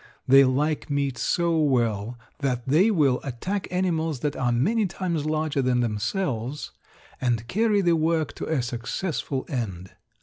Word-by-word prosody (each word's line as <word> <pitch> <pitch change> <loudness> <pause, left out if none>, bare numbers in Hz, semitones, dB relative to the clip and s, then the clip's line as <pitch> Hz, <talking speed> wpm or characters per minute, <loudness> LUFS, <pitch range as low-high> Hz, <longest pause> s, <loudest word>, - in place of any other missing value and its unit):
They 135 +1 +8
like 145 +4 0
meat 140 -2 0
so 170 -2 +1
well 120 -6 +1 0.2
that 125 -4 -2
they 165 +11 +4
will 145 - +3
attack 180 +10 -3
animals 165 -6 -1
that 150 -1 -1
are 125 -2 0
many 200 - +2
times 170 -4 -2
larger 155 -2 0
than 125 -1 +2
themselves 120 - -2 0.5
and 120 -3 0
carry 210 - +2
the 175 -3 +3
work 160 -1 0
to - - -4
a 150 -6 0
successful 130 +4 -3
end. 95 -8 -4
140 Hz, 145 wpm, -25 LUFS, 125-165 Hz, 0.5 s, They